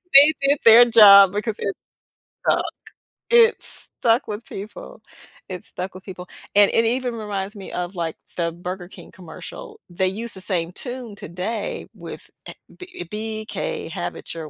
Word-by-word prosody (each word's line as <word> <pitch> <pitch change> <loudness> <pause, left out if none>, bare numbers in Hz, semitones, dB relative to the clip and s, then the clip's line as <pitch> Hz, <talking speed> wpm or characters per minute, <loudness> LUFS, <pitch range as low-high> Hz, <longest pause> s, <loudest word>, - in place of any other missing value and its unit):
They 285 +3 +10 0.2
did 285 0 +3
their 230 +1 +9
job 200 -4 +8
because 210 +2 -2
it 195 - -2 0.7
stuck. - - +3 0.7
It 470 -1 +5
stuck 235 +3 -1
with 210 +1 -5
people. 205 0 -10 0.4
It 185 +1 -7
stuck 190 -4 -6
with 185 +1 -12
people. 180 -2 -9 0.3
And 205 -1 +6
it 230 - +3
even 245 +1 0
reminds 205 -2 -4
me 195 -2 -9
of 180 +1 -4
like 165 -2 -3 0.2
the 170 -1 0
Burger 180 +1 -7
King 180 -2 -14
commercial. 430 - -11
They 185 +2 0
use 225 +5 -4
the 190 - -6
same 175 -3 0
tune 245 +1 -6
today 200 +5 -5
with, - - -10 0.2
eh - - -7 0.2
B 365 - -11
uh, - - -5
"B.K. 220 - -4
have - - -4
it - - -8
your 160 -2 -7
205 Hz, 165 wpm, -22 LUFS, 185-235 Hz, 0.7 s, They